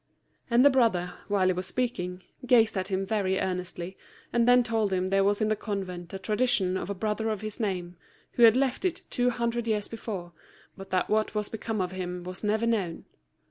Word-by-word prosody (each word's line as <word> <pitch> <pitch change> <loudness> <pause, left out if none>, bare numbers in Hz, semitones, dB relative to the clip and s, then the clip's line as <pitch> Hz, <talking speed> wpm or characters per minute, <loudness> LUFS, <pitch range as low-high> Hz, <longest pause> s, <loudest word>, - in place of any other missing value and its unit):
And 240 +2 +5
the 285 - +8
brother, 185 -9 +2
while 200 -2 +2
he 185 - +3
was 185 +1 -3
speaking, 180 -8 -2 0.2
gazed 225 -3 +5
at 190 -1 -1
him 195 -1 -1
very 195 -2 0
earnestly, 180 0 -3 0.4
and 235 0 +3
then 245 0 +6
told 225 -3 0
him 185 -1 +1
that 190 - -4
there 195 0 +4
was 205 +2 +1
in 215 - +2
the 215 - +2
convent 190 -5 -5
a 195 - -4
tradition 200 -1 +1
of 190 - -3
a 200 - -2
brother 215 +3 -1
of 215 -3 -2
his 215 -1 -5
name, 180 -5 -3 0.3
who - - -3
had 230 -1 +8
left 265 +2 0
it 370 -1 -1
two 245 0 +2
hundred 235 -1 -1
years 210 -2 0
before, 195 -6 -6 0.4
but 195 -1 -10
that 185 -1 +1
what 215 0 0
was 210 -1 0
become 225 0 -4
of 180 -1 -1
him 180 -1 -5
was 185 +2 -6
never 215 +2 +1
known. 200 -8 -1
205 Hz, 215 wpm, -28 LUFS, 185-230 Hz, 0.4 s, the